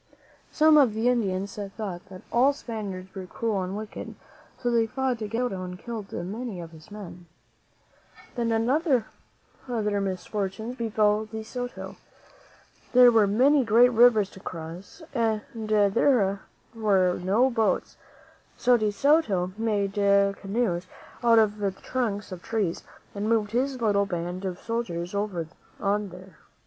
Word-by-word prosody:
Some 310 0 +6
of 245 -7 +4
the 225 +3 +2
Indians 200 -4 -1 0.2
thought 195 -4 -5
that 185 -1 -11
all 260 +4 +4
Spaniards 200 -8 -6
were 190 -2 -7
cruel 215 0 -2
and 185 +2 -4
wicked, 215 0 -7
and - - -10 0.4
so 245 -1 -1
they 230 -1 +3
fought 255 -1 -2
against 210 -1 -4
De - - 0
Soto 235 -7 -2
and 180 0 -6
killed 220 -1 -7
many 205 +3 -5
of 165 -1 -8
his 160 -2 -15
men. 185 -4 -10 1.1
Then 230 -1 0
other 275 -4 +2 1.0
misfortunes 195 +4 -3
befell 215 -2 +1
De 220 0 -7
Soto. 245 +2 -6 1.0
There 250 -1 +8
were 220 -3 +4
many 265 +7 +4
great 240 +2 +5
rivers 225 -4 +5
to - - -12
cross 170 - -8
and 225 -4 +1 0.3
there 205 0 +3 0.3
were 195 -5 +2
no 210 +9 +2
boats; 225 -2 0 0.6
so 245 0 +4
De 215 -2 0
Soto 205 - +2
made 210 -3 -1
canoes 200 -1 +1 0.4
out 230 -1 +5
of 215 -1 +3
the 200 -1 +1
trunks 205 0 -3
of 180 -1 -7
trees 205 -6 -2 0.3
and 205 +1 -2
moved 215 -3 +1
his 260 +2 0
little 205 -3 +2
band 175 +1 -4
of 185 -2 -3
soldiers 185 -7 -4
over 200 -5 -2 0.3
on 205 0 0
these. 185 +2 -12
210 Hz, 145 wpm, -26 LUFS, 195-235 Hz, 1.1 s, There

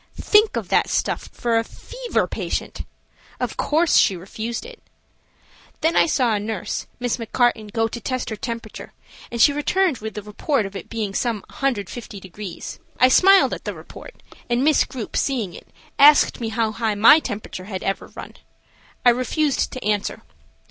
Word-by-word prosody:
Think 425 +1 +4
of - - -4
that - - +2
stuff - - -1
for 230 -1 0
a - - -1
fever - - -3
patient! - - -4 0.5
Of - - -3
course, 320 +2 +2
she 195 - +4
refused 220 - -5
it. 485 -1 -12 1.0
Then 320 +2 +2
I - - +5
saw 255 -7 +2
a 210 - 0
nurse, 210 -2 -4
Miss 245 -1 -1
McCarten, 230 -2 0
go 225 0 +1
to 235 +1 -7
test 255 -1 -3
her - - -2
temperature, 230 -2 -7 0.4
and 235 - -4
she 285 - +6
returned 315 0 +1
with 220 0 -7
a 210 - -4
report 210 +4 -1
of 195 +1 -8
it - - -7
being 215 -3 -3
some 225 -2 -1
150 225 -4 -3
degrees. 190 0 -8 0.2
I 255 - +6
smiled 385 +7 +6
at - - -6
the - - -4
report, - - -13 0.3
and 240 +2 +1
Miss 305 0 +4
Grupe, 250 -4 -7
seeing 235 -10 -1
it, - - -12 0.3
asked 290 -2 +6
me 225 - -2
how 220 0 0
high 220 -1 -1
my 230 +9 +7
temperature 205 -8 -6
had 190 -2 -6
ever 195 - -2
run. - - -11 0.7
I 245 - +8
refused 260 +4 0
to 255 - -7
answer. 210 -1 -1
235 Hz, 175 wpm, -22 LUFS, 210-275 Hz, 1.0 s, I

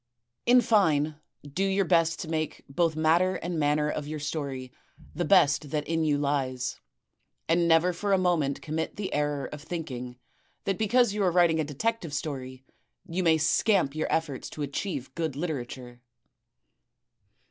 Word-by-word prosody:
In 245 +1 +7
fine, 155 -10 +2 0.3
do 145 +7 -3
your 195 0 +2
best 165 -1 +2
to - - -6
make 155 -1 -3
both 160 +3 0
matter 170 +4 +3
and 170 -1 -3
manner 150 0 +2
of 150 -1 -3
your 155 +1 -4
story 140 -4 -4 0.4
the 175 +3 -2
best 150 -6 +4
that 150 0 -2
in 165 0 0
you 150 -2 +2
lies; 135 -3 -1 0.7
and 170 +1 +3
never 165 +2 +4
for 200 +4 -2
a 195 - +5
moment 170 -7 0
commit 160 +1 -3
the 200 -2 -4
error 145 -1 0
of 150 - -8
thinking 130 -7 -6 0.5
that 195 -2 -1
because 225 0 +3
you 210 - -2
are 190 - +4
writing 170 -2 +4
a - - +2
detective 165 +3 -2
story 130 -3 -5 0.4
you 185 0 -2
may 165 -3 +4
scamp 165 0 +2
your 155 - -2
efforts 150 -5 -1
to 150 - -5
achieve 140 0 -4
good 160 -4 -2
literature. 125 -6 -5
155 Hz, 160 wpm, -28 LUFS, 145-175 Hz, 0.7 s, In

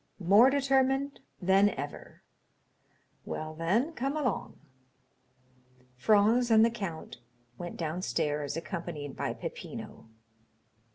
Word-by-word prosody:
"More 200 +7 +6
determined 270 0 +1 0.2
than 195 +2 +4
ever." 145 -6 -8 1.0
"Well, 155 0 -5
then, 200 - 0
come 275 +2 -2
along." 275 -5 -2 1.4
Franz 215 - +3
and 220 0 +6
the 230 - +1
count 190 -8 -6 0.4
went 175 - -6
downstairs, 150 -3 -2
accompanied 165 -5 -5
by - - -2
Peppino. - - -8
200 Hz, 95 wpm, -30 LUFS, 160-250 Hz, 1.4 s, More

